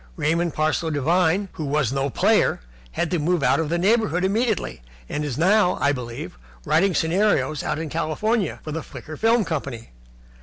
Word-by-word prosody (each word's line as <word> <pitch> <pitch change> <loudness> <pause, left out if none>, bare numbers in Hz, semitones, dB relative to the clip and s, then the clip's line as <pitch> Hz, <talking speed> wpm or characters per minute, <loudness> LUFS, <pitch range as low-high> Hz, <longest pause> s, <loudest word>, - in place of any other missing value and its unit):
Raymond 165 - 0
Parsloe 155 +1 0
Devine, 170 +6 +1
who 155 - -6
was 140 -3 0
no 135 0 0
player, - - +2 0.3
had 170 - -1
to 175 - +1
move 165 0 0
out - - +3
of 160 -2 -1
the 170 - 0
neighbourhood 195 -1 +2
immediately, 215 - -1 0.3
and 150 - -3
is 145 -5 -3
now, 185 +3 +3
I 140 - +3
believe, 120 - -6 0.3
writing 185 +3 +2
scenarios 165 -3 +1
out - - -2
in 160 0 -4
California 165 +6 -1
for 155 - -6
the 160 +2 -3
Flicker 155 0 -9
Film 225 +3 +2
Company. 135 -8 -5
160 Hz, 175 wpm, -23 LUFS, 150-190 Hz, 0.3 s, out